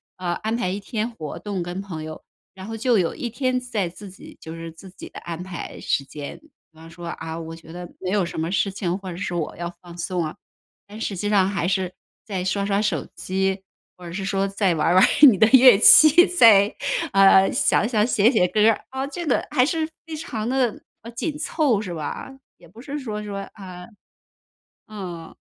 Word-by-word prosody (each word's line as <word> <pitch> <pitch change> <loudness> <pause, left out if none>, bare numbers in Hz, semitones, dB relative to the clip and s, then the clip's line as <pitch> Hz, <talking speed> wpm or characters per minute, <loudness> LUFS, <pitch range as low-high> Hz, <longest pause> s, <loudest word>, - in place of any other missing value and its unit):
啊， 180 -2 -3
安 220 +1 -1
排 230 -6 -1
1 195 +2 -3
天 220 +2 -3
活 155 -10 -7
动 200 -3 -4
跟 175 +2 -5
朋 160 -6 -7
友。 155 0 -9 0.3
然 190 0 -10
后 225 +1 -6
就 235 +1 +2
有 175 -4 0
1 240 - -5
天 255 +1 -1
在 215 -8 -3
自 200 +3 -11
己 190 - -14
就 160 +1 -9
是 165 0 -8
自 185 +4 -14
己 190 - -11
的 - - -10
安 170 +1 -7
排 185 -2 -7
时 140 - -1
间。 145 +1 -8
比 315 - -24 0.3
方 165 +1 -13
说， 170 +1 -10
啊， 165 -1 -6
我 165 0 -7
觉 165 0 -12
得 180 0 -7
没 185 -1 -4
有 200 -3 +1
什 170 - -6
么 160 +1 -2
事 195 +2 +1
情， 185 -2 -2
或 190 -2 -7
者 170 - -8
是 180 - -4
我 165 -3 -3
要 170 0 -4
放 175 -1 -12
松 175 0 -2
啊。 155 - -4 0.5
但 215 +2 -10
实 195 -4 -3
际 205 +3 -2
上 195 -2 +3
还 195 -3 -1
是， 185 -1 -1 0.3
再 190 -3 -4
刷 200 +1 -1
刷 200 0 +1
手 190 -9 -1
机， 190 +1 -1 0.4
或 180 - -12
者 170 - -8
是 195 +1 -4
说， 195 0 0
再 195 -2 +1
玩 155 - 0
儿 175 - +3
玩 185 - +7
儿 - - +7 0.2
你 200 - +2
的 220 - +6
乐 255 -4 +8
器， 310 - +8
再 220 - +5 0.4
呃， 195 0 +6
想 215 - +2
想、 215 -3 +2
写 230 0 +3
写 180 -7 +3
歌 210 +4 0
儿 220 - -3
啊。 265 +1 -3
这 315 +5 -6
个 - - +1
还 255 -3 +3
是 320 0 -1 0.2
非 325 -1 -7
常 230 -8 -5
地， 250 -3 0 0.2
啊， 230 - -10
紧 295 +6 -4
凑， 285 - 0
是 180 -5 -6
吧？ 155 - -5 0.3
也 170 - -18
不 205 +8 -17
是 290 +2 -5
说 210 -5 -5
说 200 -1 -5
啊， 185 -2 -10 1.0
嗯。 180 -6 -8
195 Hz, 235 characters per minute, -23 LUFS, 175-225 Hz, 1.0 s, 乐